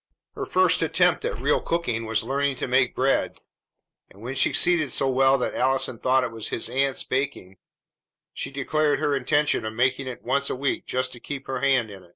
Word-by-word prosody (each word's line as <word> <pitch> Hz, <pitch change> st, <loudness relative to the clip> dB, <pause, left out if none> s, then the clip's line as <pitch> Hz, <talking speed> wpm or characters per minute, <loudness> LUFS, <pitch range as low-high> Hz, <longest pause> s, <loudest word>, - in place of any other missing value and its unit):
Her -, -, -5 dB
first -, -, +3 dB
attempt -, -, +2 dB
at 485 Hz, -, -2 dB
real -, -, +1 dB
cooking 120 Hz, -10 st, -2 dB
was 110 Hz, 0 st, 0 dB
learning 140 Hz, +3 st, -1 dB
to 125 Hz, -, -4 dB
make 125 Hz, 0 st, +2 dB
bread; 135 Hz, +1 st, +1 dB, 0.7 s
and, 100 Hz, -, -18 dB
when 125 Hz, +3 st, -4 dB
she 135 Hz, -, +3 dB
succeeded 170 Hz, -6 st, +2 dB
so 135 Hz, -, +1 dB
well 135 Hz, +1 st, +3 dB
that 125 Hz, -, -2 dB
Allison 130 Hz, -2 st, 0 dB
thought 130 Hz, 0 st, +2 dB
it 120 Hz, -, -3 dB
was 115 Hz, -1 st, -4 dB
his -, -, -1 dB
aunt's 135 Hz, 0 st, 0 dB
baking, 130 Hz, -9 st, -3 dB, 0.8 s
she -, -, -4 dB
declared 145 Hz, +2 st, 0 dB
her 145 Hz, -1 st, 0 dB
intention 145 Hz, +2 st, +1 dB
of 110 Hz, 0 st, -4 dB
making 130 Hz, +2 st, 0 dB
it 125 Hz, -, -7 dB
once 140 Hz, +3 st, 0 dB
a -, -, -2 dB
week 135 Hz, +1 st, -2 dB
just 130 Hz, 0 st, -1 dB
to 120 Hz, -, -9 dB
keep 135 Hz, +2 st, -7 dB
her 135 Hz, -1 st, -3 dB
hand 130 Hz, -5 st, +1 dB
in. 95 Hz, -3 st, -13 dB
130 Hz, 200 wpm, -24 LUFS, 125-140 Hz, 0.8 s, first